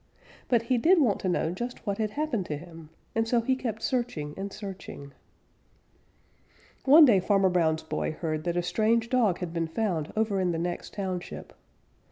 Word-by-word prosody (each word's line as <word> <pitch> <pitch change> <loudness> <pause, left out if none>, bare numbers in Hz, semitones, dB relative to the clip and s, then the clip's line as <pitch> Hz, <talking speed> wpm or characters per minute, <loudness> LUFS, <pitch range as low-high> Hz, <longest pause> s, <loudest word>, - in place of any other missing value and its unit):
But 235 -3 +2
he 245 +1 +1
did 345 +8 +5
want 235 -9 +2
to 185 - -1
know 170 -2 0
just 240 +8 -6
what 200 -1 -2
had 215 -1 0
happened 235 - -2
to 150 - -3
him, 165 -1 -12 0.2
and 225 0 0
so 240 +1 +3
he 260 +3 +1
kept 225 -4 -4
searching 235 - -2
and 200 +1 -5
searching. 190 -9 -8 1.7
One 300 +4 +9
day 220 -8 +5
Farmer 195 0 +3
Brown's 160 -3 +1
boy 160 - -2
heard 155 -1 -3
that 175 0 -1
a 175 - +1
strange 220 +6 +1
dog 230 -8 +2
had 170 -2 -4
been 165 -1 -1
found 165 -3 -2
over 215 -3 +1
in 180 -2 +1
the - - -2
next 175 +1 -4
township. 185 -3 -5
195 Hz, 185 wpm, -28 LUFS, 170-230 Hz, 1.7 s, One